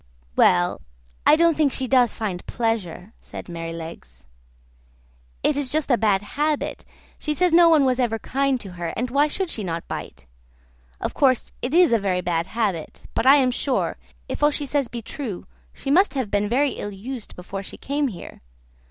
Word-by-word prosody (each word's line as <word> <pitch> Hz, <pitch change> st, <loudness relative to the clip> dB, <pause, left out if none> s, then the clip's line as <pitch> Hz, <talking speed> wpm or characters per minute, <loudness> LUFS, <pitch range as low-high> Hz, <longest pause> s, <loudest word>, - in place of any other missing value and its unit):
"Well, 90 Hz, 0 st, +3 dB, 0.5 s
I -, -, +8 dB
don't 335 Hz, 0 st, +4 dB
think 295 Hz, -3 st, +2 dB
she 260 Hz, 0 st, -2 dB
does 250 Hz, -2 st, +4 dB
find 195 Hz, -5 st, -4 dB
pleasure," 220 Hz, -4 st, -2 dB
says -, -, -8 dB
Merrylegs; 165 Hz, -, -8 dB, 1.2 s
"it 300 Hz, -, +2 dB
is 280 Hz, -3 st, -1 dB
just 305 Hz, -2 st, 0 dB
a -, -, +6 dB
bad 205 Hz, -3 st, +2 dB
habit; 295 Hz, +7 st, -2 dB, 0.3 s
she 300 Hz, -1 st, -2 dB
says 360 Hz, +1 st, +2 dB
no 340 Hz, 0 st, +7 dB
one 310 Hz, -4 st, +5 dB
was 255 Hz, -1 st, +1 dB
ever 235 Hz, -3 st, +1 dB
kind 270 Hz, +3 st, 0 dB
to 195 Hz, -, -8 dB
her, 170 Hz, -2 st, -5 dB
and 245 Hz, +1 st, -2 dB
why 285 Hz, +3 st, +4 dB
should 365 Hz, +4 st, -2 dB
she 215 Hz, -, -4 dB
not 170 Hz, -2 st, -4 dB
bite? 65 Hz, +1 st, -7 dB, 0.7 s
Of -, -, -3 dB
course, 260 Hz, -4 st, +2 dB
it 260 Hz, +6 st, -1 dB
is 350 Hz, -7 st, +6 dB
a 230 Hz, -, +4 dB
very 185 Hz, -2 st, 0 dB
bad 170 Hz, -1 st, -1 dB
habit; 195 Hz, -7 st, -3 dB
but 255 Hz, -, 0 dB
I 275 Hz, -, +9 dB
am 260 Hz, -3 st, +3 dB
sure, 260 Hz, +1 st, -1 dB, 0.3 s
if -, -, -5 dB
all 295 Hz, -, +6 dB
she 295 Hz, 0 st, -2 dB
says 280 Hz, -2 st, 0 dB
be 235 Hz, 0 st, -7 dB
true, 230 Hz, -7 st, -6 dB, 0.3 s
she 270 Hz, -, -4 dB
must 370 Hz, +2 st, +4 dB
have 255 Hz, -6 st, -2 dB
been 205 Hz, 0 st, +1 dB
very 275 Hz, +4 st, +2 dB
ill 205 Hz, -, -5 dB
used 225 Hz, +4 st, -7 dB
before 190 Hz, +2 st, -6 dB
she 195 Hz, -, -10 dB
came 285 Hz, +1 st, -1 dB
here. 200 Hz, -9 st, -9 dB
245 Hz, 190 wpm, -23 LUFS, 195-285 Hz, 1.2 s, I